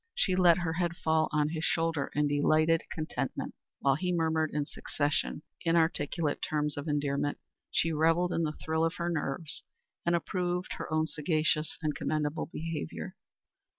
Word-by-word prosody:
She 185 - +2
let 175 -2 +6
her 170 -3 -1
head 175 0 0
fall 160 0 +2
on 150 -1 +2
his 160 0 -3
shoulder 165 -4 +1
in 150 0 +3
delighted 155 +3 +3
contentment. 155 -1 -3 0.3
While 140 - +4
he 180 +2 -1
murmured 160 -2 +1
in 145 -1 0
succession 145 +1 -1 0.2
inarticulate 165 -2 +1
terms 150 -1 0
of 145 +2 -5
endearment, 145 -1 0 0.3
she 165 - +2
revelled 165 +3 +3
in - - +1
the 155 -1 -1
thrill 160 0 +1
of 165 +1 +1
her 170 0 -1
nerves 150 0 -3 0.4
and 170 0 +3
approved 180 +1 -1
her - - -5
own 155 0 +2
sagacious 155 0 0
and 150 -1 +1
commendable 150 0 -1
behavior. 165 - -5
160 Hz, 155 wpm, -30 LUFS, 150-165 Hz, 0.4 s, let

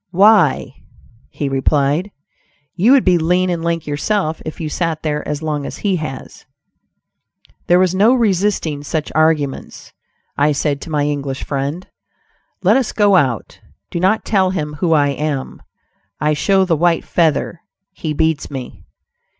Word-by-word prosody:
"Why," 200 +2 +3 0.5
he 145 - -4
replied, 140 +6 +1 0.6
"you 200 +8 +3
would 275 - +4
be 180 -2 +4
lean 180 +3 +1
and 170 -2 -3
lank 170 -1 -1
yourself 155 +2 -1
if 155 - -7
you 160 - -3
sat 160 0 -2
there 150 -1 -2
as 150 +1 -4
long 150 -2 -2
as - - -6
he 195 -3 +2
has." 145 -5 -8 1.2
There 175 - +5
was 185 -1 +2
no 215 +7 +4
resisting 195 - 0
such 150 +1 -3
arguments. 155 -3 -1 0.4
I 150 +1 +2
said 140 0 -1
to - - -8
my 150 -2 0
English 140 -2 -3
friend, 140 +6 -3 0.8
"Let 205 +7 +5
us 260 -4 -1
go 205 -2 +3
out; 130 - 0 0.3
do 170 - -2
not 190 +5 +1
tell 190 -3 +2
him 150 -5 -3
who 165 -1 +2
I 145 -2 +3
am; 140 -1 -3 0.6
I 150 0 +1
show 190 +5 +2
the 170 -3 +1
white 170 +1 +1
feather; 165 0 0 0.3
he 160 -4 -5
beats 160 0 0
me." 130 -3 -8
160 Hz, 155 wpm, -18 LUFS, 145-185 Hz, 1.2 s, There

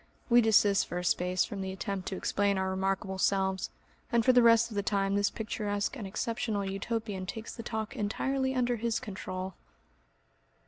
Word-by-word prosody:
We 240 0 +8
desist 205 -3 +4
for 175 - -4
a 180 - -2
space 180 0 +2
from 200 - -6
the 190 0 -3
attempt 190 -1 -4
to 190 - -2
explain 200 +1 +1
our 190 0 0
remarkable 190 0 -1
selves, 190 -1 +1 0.4
and 235 -2 +3
for 255 - +6
the 245 - +7
rest 230 0 +5
of - - -7
the 200 - +1
time 195 -1 0
this 205 0 +2
picturesque 210 0 -2
and 220 -7 -5
exceptional 215 0 -2
Utopian 195 -1 -3
takes 225 +3 -6
the 230 - -7
talk 220 -2 -4
entirely 265 +5 -1
under 245 -1 +1
his 230 0 0
control.... 190 -2 -5
205 Hz, 180 wpm, -30 LUFS, 190-230 Hz, 0.4 s, We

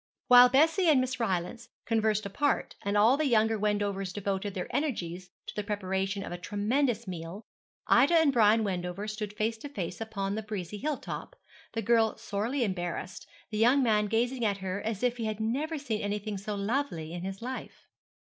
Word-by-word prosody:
While 250 0 +9
Bessie 325 +7 +4
and 290 -4 +6
Miss 255 0 -1
Rylance 190 -1 -2 0.2
conversed 220 -2 +1
apart, 280 +9 0
and 200 +1 0
all 225 +6 +5
the 310 - +1
younger 220 -2 +3
Wendovers 205 -2 -1
devoted 200 0 -3
their 180 - -2
energies 180 - -2 0.2
to - - -7
the 210 - -2
preparation 195 -1 -2
of - - -7
a 175 - -5
tremendous 220 +5 0
meal, 175 +4 -7 0.4
Ida 280 +8 +5
and 320 -4 +5
Brian 220 -1 +5
Wendover 185 +1 -3
stood 210 -1 -4
face 220 +2 -2
to 290 - -7
face 180 -7 -5
upon 200 -3 -3
the 220 - -2
breezy 205 -2 -5
hill 300 +2 -1
top, - - -7 0.4
the 225 - -2
girl 225 0 +3
sorely 230 +7 -2
embarrassed, 180 -2 -4 0.2
the 215 - -2
young 255 +5 +5
man 210 -3 +2
gazing 240 +3 0
at 205 -3 +1
her 190 +1 -4
as 220 0 -3
if 245 -1 +1
he 230 - -3
had 215 -1 -3
never 280 +9 -1
seen 235 -7 -3
anything 205 0 -3
so 205 +2 -4
lovely 200 - -2
in 175 - -5
his 195 +1 -5
life. 255 +1 -7
215 Hz, 190 wpm, -29 LUFS, 195-245 Hz, 0.4 s, While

